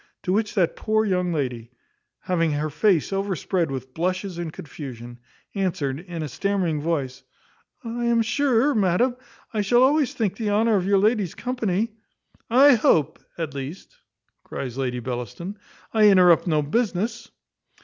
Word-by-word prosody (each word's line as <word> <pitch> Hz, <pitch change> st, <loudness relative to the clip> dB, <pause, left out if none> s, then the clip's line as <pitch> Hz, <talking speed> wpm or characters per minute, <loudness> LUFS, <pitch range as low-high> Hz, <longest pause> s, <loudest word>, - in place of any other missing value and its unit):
To 185 Hz, -, 0 dB
which 210 Hz, +1 st, 0 dB
that 180 Hz, -4 st, +2 dB
poor 220 Hz, 0 st, +1 dB
young 180 Hz, -3 st, 0 dB
lady, 125 Hz, -7 st, -3 dB, 0.5 s
having 165 Hz, -4 st, 0 dB
her 150 Hz, +1 st, -2 dB
face 185 Hz, +2 st, +2 dB
overspread 190 Hz, -3 st, -1 dB
with 130 Hz, -1 st, -6 dB
blushes 185 Hz, +2 st, -2 dB
and 170 Hz, -2 st, -4 dB
confusion, 120 Hz, -6 st, -9 dB, 0.3 s
answered, 165 Hz, -9 st, -2 dB
in 170 Hz, -2 st, -6 dB
a -, -, -3 dB
stammering 180 Hz, -1 st, -1 dB
voice, 145 Hz, -5 st, -2 dB, 0.6 s
"I 235 Hz, +1 st, -3 dB
am 235 Hz, -1 st, +3 dB
sure, 270 Hz, +2 st, +2 dB
madam, 215 Hz, +5 st, +2 dB, 0.4 s
I 215 Hz, -, 0 dB
shall 240 Hz, +5 st, +4 dB
always 285 Hz, 0 st, +2 dB
think 205 Hz, -5 st, -1 dB
the 220 Hz, -3 st, -2 dB
honour 220 Hz, +2 st, +3 dB
of 190 Hz, -2 st, 0 dB
your 200 Hz, 0 st, +4 dB
ladyship's 205 Hz, -3 st, +1 dB
company 230 Hz, -4 st, -1 dB, 0.3 s
" -, -, -37 dB, 0.2 s
"I -, -, +8 dB
hope, 165 Hz, -, +2 dB, 0.2 s
at 160 Hz, -4 st, -4 dB
least," 140 Hz, -, -7 dB, 0.5 s
cries 125 Hz, -3 st, -6 dB
Lady 125 Hz, -2 st, -2 dB
Bellaston, 125 Hz, -, -6 dB, 0.3 s
"I 215 Hz, -2 st, +6 dB
interrupt 180 Hz, -3 st, +5 dB
no 155 Hz, -3 st, +2 dB
business." 210 Hz, +5 st, -1 dB
185 Hz, 150 wpm, -24 LUFS, 150-215 Hz, 0.6 s, I